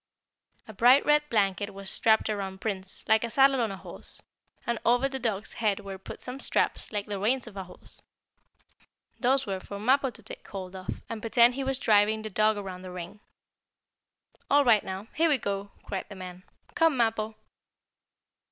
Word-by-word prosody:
A 220 - -9
bright 245 +7 +6
red 295 0 +5
blanket 205 -2 0
was 195 0 -8
strapped 220 +2 +3
around 195 -3 -3
Prince, 190 -3 -3
like 220 0 +4
a 235 - -2
saddle 270 +1 +4
on 225 - +1
a 195 - -6
horse, - - -9 0.5
and 235 -2 -1
over 245 +3 +3
the 265 -1 -4
dog's 215 -4 -2
head 210 -2 +1
were 195 -1 -7
put - - -9
some 255 +2 -6
straps - - -1
like 205 -2 -2
the 205 -2 -4
reins 245 +6 +1
of 225 -4 -11
a 190 -1 -5
horse. 180 - -11 1.2
Those 270 +2 +2
were 195 -3 -3
for 200 +2 -8
Mappo 265 +6 +3
to 230 -2 -12
take 220 - -10
hold 190 -1 -7
of, 185 -1 -6
and 225 -1 -5
pretend 235 +2 +5
he 270 +2 -3
was 265 0 -1
driving 215 -2 +3
the 215 - -5
dog 215 +2 +3
around 190 -2 -6
the 185 - -8
ring. 180 +3 -8 1.3
"All 285 0 +5
right 225 -4 +5
now. 190 +2 -5
Here 330 +2 +3
we 290 - +4
go!" 200 -3 -3
cried 195 - -5
the 205 - -9
man. 185 0 -9 0.3
"Come, 325 -4 +3
Mappo!" 225 -2 0
215 Hz, 190 wpm, -28 LUFS, 195-245 Hz, 1.3 s, bright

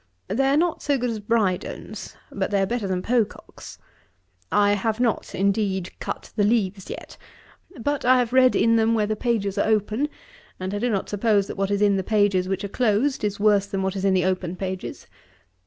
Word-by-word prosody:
They 265 +8 +1
are 275 +2 +3
not 340 +1 +1
so 285 -1 +1
good 245 -1 -1
as 220 - -4
Brydone's, 205 -4 -2 0.2
but - - -2
they 200 -2 +1
are - - +2
better 230 -1 -2
than 185 -1 -2
Pococke's. 235 -3 -2 0.7
I 205 0 +4
have 215 +2 -1
not, 245 -2 -1
indeed, 195 -2 0
cut - - -6
the 210 - +2
leaves 205 -3 0
yet; - - -8 0.6
but 285 +5 -1
I 255 +1 +5
have 245 -1 0
read 255 -1 +5
in 230 0 +4
them 225 +1 +3
where 215 -2 +2
the 215 +1 -1
pages 205 -4 -1
are - - +2
open, 220 +6 +1 0.5
and 185 +1 -4
I 205 - -2
do 245 +3 0
not 200 -4 -1
suppose 205 -1 +2
that - - -7
what 195 0 -1
is 205 0 +1
in 200 -1 +4
the 190 - -1
pages 200 -3 +2
which 195 0 -2
are - - -2
closed 240 +5 +1
is 205 -1 -1
worse 205 -1 +3
than 195 -1 -2
what 190 0 -1
is 195 - -3
in 195 -1 +3
the 180 -1 +2
open 185 -1 -1
pages. 185 0 -5
205 Hz, 210 wpm, -24 LUFS, 195-230 Hz, 0.7 s, I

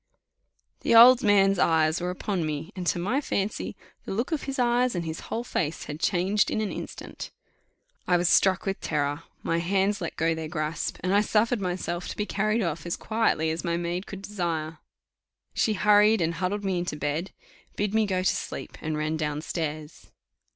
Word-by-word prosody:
The - - +2
old 245 +2 +9
man's 195 -2 +4
eyes 160 0 +3
were 180 - -1
upon 180 0 -2
me; 155 +3 -4
and 180 -2 -4
to - - +2
my 210 +11 0
fancy 200 -7 -2 0.3
the - - -6
look 235 - -2
of 315 - -2
his 275 0 -4
eyes 245 -1 +2
and 170 -1 -2
his 160 0 -4
whole 230 - -2
face 165 -9 -2
had 150 +1 -7
changed 195 +3 +2
in - - -1
an 215 -2 -1
instant. - - -7 0.8
I 180 - +4
was 175 0 +1
struck 190 +1 +4
with 195 -1 -2
terror 145 0 -1 0.2
my 165 - 0
hands 195 +3 +1
let 170 - -4
go 165 +1 +1
their 160 -1 -4
grasp 155 -1 -3
and 185 +1 0
I 205 - +5
suffered 220 +1 +1
myself 180 -1 -3
to - - -6
be 210 - -1
carried 215 +2 0
off 170 0 -3
as 170 - -2
quietly 215 -8 +1
as 160 - -4
my 170 -1 0
maid 175 +2 -3
could 195 -1 -8
desire. 165 -6 -3 0.7
She 220 - +1
hurried 210 +2 +5
and 170 -1 0
huddled 195 +4 -2
me 185 -2 0
into 175 -3 -3
bed, 150 +5 -2 0.5
bid 205 0 -1
me 220 -1 +3
go 185 -2 0
to 185 - +2
sleep, - - -6
and 155 -1 -2
ran 155 +1 -1
down 150 -1 -2
stairs. 155 -2 -5
180 Hz, 195 wpm, -26 LUFS, 160-210 Hz, 0.8 s, old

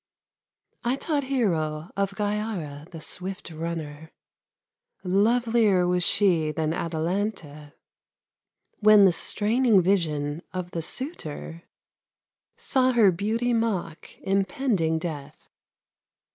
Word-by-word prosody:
I 245 +2 +1
taught 285 0 -2
Hero, 170 - -1
of 200 0 -1
Gyara, 205 -8 -3
the 165 -2 -10
swift 185 +2 -5
runner; 160 -1 -6 0.9
Lovelier 215 0 +2
was 180 0 +1
she 180 -6 +2
than 155 0 -1
Atalanta, 165 -3 -3 1.1
When 210 -1 +7
the 190 - +6
straining 220 +5 +3
vision 160 -5 0
of 180 -1 -5
the 165 - -3
suitor 165 - -4 0.9
Saw 260 - +2
her 220 -5 +5
beauty 220 +7 -1
mock 205 -8 -3
impending 195 - 0
death. 155 -4 -6
185 Hz, 95 wpm, -25 LUFS, 160-220 Hz, 1.1 s, When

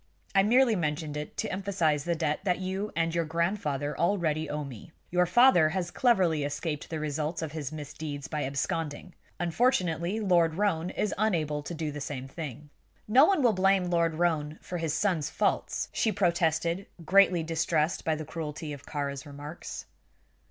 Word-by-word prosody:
I 195 - +6
merely 235 +3 +4
mentioned 150 -3 -2
it 150 0 -6
to 220 - -2
emphasize 180 -7 0
the 170 -1 +1
debt 155 -2 0
that 180 -3 +1
you 190 +3 -3
and 165 0 +1
your 170 0 +1
grandfather 160 -4 -1
already 165 -4 0
owe 150 0 -2
me. 135 +1 -10 0.2
Your 180 0 +3
father 180 -6 +6
has 175 0 -2
cleverly 185 - +3
escaped 145 +1 -3
the 160 - -3
result 155 +2 -2
of 155 - -4
his 150 -3 -5
misdeeds 145 -1 -6
by 150 -2 -2
absconding. 145 +5 -3 0.3
Unfortunately, 175 -1 +1
Lord 175 -6 +3
Roane 180 -3 0
is 210 - -1
unable 160 -9 +1
to 170 +4 -6
do 155 -1 -3
the 145 0 -6
same 135 -2 -5
thing." 145 0 -8 0.4
"No 255 +7 +7
one 355 -5 +2
will 235 -3 +5
blame 190 -1 +2
Lord 170 -2 +2
Roane 155 -3 0
for 175 - -5
his 160 -2 -1
son's 160 -4 0
faults," - - 0
she 220 - +1
protested, 170 -1 +1 0.2
greatly 185 -2 +5
distressed 160 0 0
by 160 - +1
the 155 0 -6
cruelty 155 -1 -5
of 140 - -11
Kāra's 140 -1 -4
remarks. 145 +3 -8
165 Hz, 170 wpm, -29 LUFS, 150-185 Hz, 0.4 s, No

